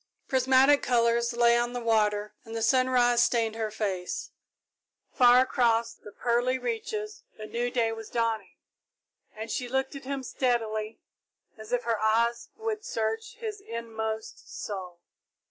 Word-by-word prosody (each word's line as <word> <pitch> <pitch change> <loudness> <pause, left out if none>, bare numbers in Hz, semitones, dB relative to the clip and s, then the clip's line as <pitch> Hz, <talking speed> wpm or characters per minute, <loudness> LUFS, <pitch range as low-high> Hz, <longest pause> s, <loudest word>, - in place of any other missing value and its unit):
Prismatic 265 +2 +4
colours 235 -1 +2
lay 235 0 +4
on 240 0 0
the 245 - -2
water 210 -2 +1
and 225 -1 -9
the 225 - -2
sunrise 245 0 +4
stained 230 -2 +2
her 220 -1 -2
face. 195 -4 -3 0.8
Far 245 0 +6
across 235 -3 +1
the 210 - -13
pearly 245 +4 +1
reaches 435 - -4 0.2
a 215 - -7
new 240 +3 -2
day 235 -2 +1
was 225 -1 -7
dawning, 230 -2 -1 0.8
and 220 +1 -7
she 245 +2 -3
looked 265 +2 -1
at 275 - -9
him 275 0 -3
steadily, 225 -4 -1 0.6
as 220 +1 -11
if 245 0 +1
her 230 -2 0
eyes 230 +2 +1
would 440 -1 -3
search 225 - -3
his 435 -3 -6
inmost 225 - -5 0.2
soul. 185 -4 -6
235 Hz, 145 wpm, -28 LUFS, 220-255 Hz, 0.8 s, Far